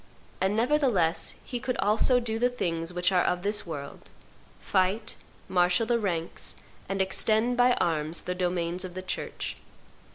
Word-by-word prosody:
And, 190 +2 +2
nevertheless, 230 - +2
he 245 - -4
could 255 0 -2
also 225 +4 +4
do 225 -2 -2
the 245 +1 +3
things 165 -8 -2
which 180 +1 +1
are 180 -1 +4
of 180 0 0
this 205 -1 +1
world, 145 -4 -7 0.5
fight, 195 +4 0 0.3
marshal 180 +5 +3
the 235 +1 +1
ranks, 170 -6 -3 0.3
and 195 0 +1
extend 220 +5 +2
by 245 0 +5
arms 160 -4 0
the 180 - -3
domains 180 -1 -1
of 180 -1 -7
the 185 - -5
Church. 185 - -4
190 Hz, 155 wpm, -28 LUFS, 175-230 Hz, 0.5 s, by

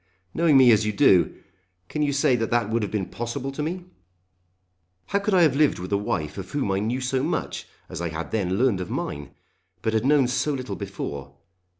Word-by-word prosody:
Knowing 165 -4 +4
me 130 -2 +7
as 110 -1 +4
you 105 - 0
do, 95 -3 +4 0.5
can 150 - -3
you 145 -1 +2
say 140 -1 +3
that 115 -2 -1
that 115 -3 +1
would 115 +1 +1
have 105 - -2
been 105 -3 -1
possible 120 +6 -5
to 140 - -5
me? 175 +4 -4 1.2
How 200 - +1
could 200 0 0
I 180 - +6
have 150 -5 +3
lived 150 0 +3
with 90 +2 -7
a 100 - +3
wife 80 -4 -3
of 95 - -7
whom 135 -9 0
I 95 - +1
knew 115 +5 -1
so 130 0 -1
much 160 +3 -3 0.2
as - - -6
I 85 - -2
had 80 +1 -6
then 95 -4 0
learned 115 -6 +2
of 90 - -5
mine, 70 -1 -4 0.5
but 110 - 0
had 110 0 +1
known 140 -1 +4
so 140 +4 0
little 130 -1 -5
before. 70 -9 -6
120 Hz, 220 wpm, -24 LUFS, 95-140 Hz, 1.2 s, me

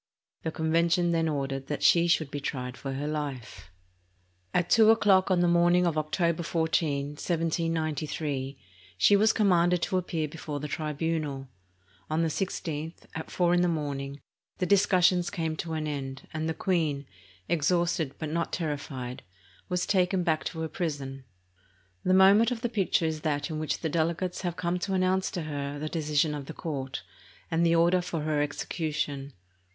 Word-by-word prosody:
The - - -2
Convention 170 +2 +2
then 165 -1 +1
ordered 135 -2 -3
that 150 - -3
she 170 0 +5
should 160 -4 +2
be 145 - -3
tried 125 -3 -4
for 135 0 -5
her 140 +2 -3
life. 135 -11 -5 0.8
At 175 - +1
two 220 +2 +6
o'clock 205 -4 +5
on 180 -2 +3
the 175 - +4
morning 175 +1 +4
of 170 -2 +1
October 165 +2 0
14, 160 -4 0
1793, 155 -3 -2 0.4
she 205 - +6
was 215 +2 +5
com 210 -3 +2
manded 175 0 +4
to 185 - +1
appear 165 -3 -2
before 150 -1 -6
the 150 - -4
tribunal. 150 -2 -2 0.6
On 155 +2 +1
the 165 - +1
i6th, 160 -2 -4
at 160 - -6
four 175 -1 +2
in 175 - +4
the 180 - +3
morning, 140 -4 -3 0.4
the 185 - 0
discussions 180 -2 +4
came 160 -5 -2
to 165 0 -4
an 155 -1 -2
end, 135 -2 -5
and 155 +1 -2
the 160 - -2
queen, 155 -7 0 0.4
exhausted 170 -2 +1
but 155 - -4
not 165 +2 -1
terrified, 140 -6 -4 0.5
was 180 -1 0
taken 185 -2 +2
back 160 -2 +1
to 160 - -4
her 160 - -1
prison. 140 -6 -4 0.8
The 185 - +3
moment 200 +4 +6
of 245 -3 -3
the 240 - -1
picture 195 -6 +1
is 160 -1 -2
that 150 +1 -1
in 155 - -3
which 155 - -2
the 160 - 0
delegates 170 +3 -1
have 175 -2 -2
come 175 +1 -1
to 190 +1 -1
announce 185 0 +2
to 175 -5 -4
her 145 -1 -4
the 155 +2 -4
decision 155 -1 +1
of 145 -2 -6
the - - -6
court 135 -5 -4 0.5
and 165 +1 +2
the 170 0 +4
order 175 +2 +4
for 170 -3 -3
her 150 -1 0
execution. 145 -2 -3
160 Hz, 175 wpm, -28 LUFS, 145-175 Hz, 0.8 s, two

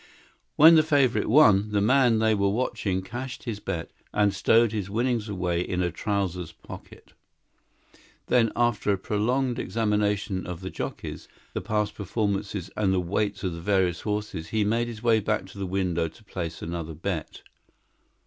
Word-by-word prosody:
When 160 +3 +9
the 160 - +7
favorite 140 -9 +2
won, 105 -6 +5
the 100 - +3
man 120 +2 +4
they 110 0 +3
were 100 -1 +2
watching 100 -4 -1
cashed 120 +6 -6
his 115 -5 -4
bet 85 -5 -4 0.2
and 105 -1 +2
stowed 110 +4 +3
his 105 -4 -3
winnings 115 0 -1
away 90 -3 -1
in 90 0 -1
a 90 - 0
trousers 90 -4 -2
pocket. - - -13 1.1
Then, 115 -3 +3
after 120 -4 +1
a 100 - +1
prolonged 120 +6 0
examination 105 -2 -1
of 90 0 -6
the 95 - -6
jockeys, - - -6 0.3
the - - -2
past 105 -1 -1
performances 100 -2 -2
and 100 -3 +1
the 95 - +2
weights 100 +3 -2
of 90 -3 -1
the 85 - -7
various 95 -2 +1
horses, 105 -6 -3
he 110 -1 0
made 115 +3 +1
his 115 -1 -8
way 115 -2 +4
back 100 -2 -1
to 100 - -11
the 95 - -3
window 90 -3 0
to 80 +7 -15
place 85 -5 -6
another 85 -1 -5
bet. 85 0 -4
105 Hz, 170 wpm, -26 LUFS, 95-110 Hz, 1.1 s, When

